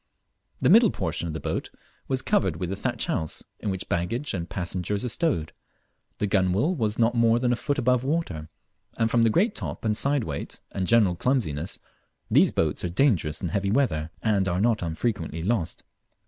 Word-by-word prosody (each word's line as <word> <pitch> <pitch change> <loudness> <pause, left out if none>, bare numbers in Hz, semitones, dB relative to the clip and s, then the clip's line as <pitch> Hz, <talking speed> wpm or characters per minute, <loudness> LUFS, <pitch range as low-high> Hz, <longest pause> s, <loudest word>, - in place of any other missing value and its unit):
The - - +3
middle - - +7
portion 85 - -2
of 80 - -4
the - - -3
boat - - -3 0.4
was 130 -1 -1
covered 205 -2 +1
with 90 0 -4
a - - -1
thatch - - -1
house, 80 - -2 0.2
in 105 - -3
which 95 -1 -4
baggage 115 +12 -1
and 85 -3 -4
passengers 95 +4 -2
are - - -1
stowed; 125 - -1 0.6
the - - 0
gunwale 100 - +2
was 110 - -1
not 115 0 +3
more 115 -1 +4
than 120 0 +2
a - - +1
foot 145 +4 -2
above 125 -1 +2
water, 130 - -2 0.5
and 115 -1 +1
from 120 - +3
the 115 - +5
great 205 - +2
top - - -5
and 105 -1 +2
side 140 +2 +1
weight, 70 -6 -5
and 95 -2 -2
general 110 -6 +4
clumsiness, 85 - -1 0.5
these - - +6
boats 80 -2 0
are 90 - -1
dangerous 85 - +1
in 90 - -1
heavy 100 +2 -1
weather, 90 - +1
and 100 -4 +2
are 90 0 0
not 110 +1 +2
unfrequently 85 -1 -2
lost. 95 -4 -1
105 Hz, 190 wpm, -26 LUFS, 85-120 Hz, 0.6 s, middle